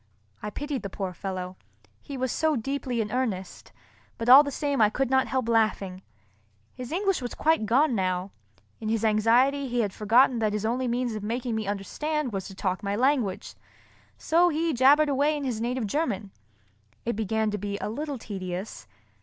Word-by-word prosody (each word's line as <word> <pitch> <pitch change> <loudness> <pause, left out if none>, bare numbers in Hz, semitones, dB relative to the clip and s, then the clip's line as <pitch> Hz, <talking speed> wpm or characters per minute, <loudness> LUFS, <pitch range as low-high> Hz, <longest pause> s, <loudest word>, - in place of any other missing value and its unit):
I 210 - -4
pitied 290 +4 -4
the 200 - -5
poor 190 -1 -4
fellow, 185 0 -5 0.4
he 280 -2 -7
was 260 -1 -1
so 315 -1 +1
deeply 255 -1 -2
in 210 -1 -4
earnest; 215 -8 -3 0.5
but 230 0 -2
all 265 +3 +11
the 290 - -2
same 285 -2 -1
I 210 - +6
could 260 +3 -1
not 265 0 +3
help 260 -3 -1
laughing. 215 -5 +1 0.7
His 250 +1 -8
English 390 -1 0
was 245 - -5
quite 315 -9 +2
gone 265 +5 +3
now. 185 -2 -1 0.5
In 215 - -4
his 225 0 0
anxiety 240 +6 +3
he 245 -1 0
had 205 -3 -2
forgotten 235 +4 +3
that 215 -2 0
his 210 0 -2
only 250 +3 0
means 240 0 -1
of 215 - -4
making 235 +3 -3
me 220 -2 -2
understand 255 +7 -2
was 195 -1 -3
to 195 - -10
talk 190 0 -2
my 200 -1 -2
language, 245 -5 0 0.6
so 345 +2 +3
he 325 0 0
jabbered 280 +4 +5
away 290 +2 +1
in 290 - -5
his 240 -5 -2
native 245 0 -1
German. 205 -5 -2 0.7
It 235 - -1
began 220 0 0
to 210 - -3
be 200 +1 -3
a - - -4
little 285 +6 -4
tedious. 190 - -6
235 Hz, 185 wpm, -26 LUFS, 205-275 Hz, 0.7 s, all